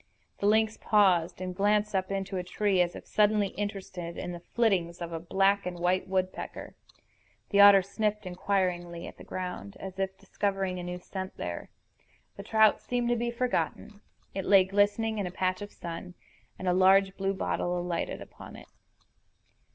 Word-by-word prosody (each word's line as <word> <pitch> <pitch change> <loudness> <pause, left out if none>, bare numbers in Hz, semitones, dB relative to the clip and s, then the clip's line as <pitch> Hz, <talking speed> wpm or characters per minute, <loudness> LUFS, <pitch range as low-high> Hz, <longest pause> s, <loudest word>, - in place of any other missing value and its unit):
The 200 - +1
lynx 220 +1 +3
paused, 185 -5 +3
and 185 -1 -4
glanced 210 +2 +2
up 190 -1 0
into 195 0 -3
a 180 - -2
tree, 195 +1 +1
as 175 0 0
if - - -9
suddenly 210 -1 +2
interested 190 -4 -5
in 180 - -4
the 175 - -6
flittings 180 -4 0
of 170 -1 -5
a 165 - -3
black 195 +3 +2
and 180 -1 -4
white 180 +2 +1
woodpecker. 185 0 -3 0.8
The 200 - +6
otter 200 -1 +9
sniffed 210 +1 -2
inquiringly 180 -2 -1
at - - -10
the - - -10
ground, 180 - -6
as 190 0 -8
if 190 0 -2
discovering 195 -3 -2
a - - -5
new 180 0 -4
scent 190 +1 -7
there. 85 0 -5 0.7
The - - -7
trout 220 +1 +4
seemed 245 -1 -1
to 240 - +3
be 235 0 -1
forgotten. 235 -3 -2 0.3
It 195 -1 -3
lay 195 -2 +7
glistening 205 +3 +1
in 195 - -1
a - - -6
patch 185 +1 -1
of 205 0 -7
sun; 175 +1 -7 0.4
and 185 - -5
a 180 - +3
large 190 +1 +5
blue 195 0 -1
bottle 180 -1 -1
alighted 175 -1 -3
upon - - -12
it. - - -13
190 Hz, 175 wpm, -29 LUFS, 180-205 Hz, 0.8 s, otter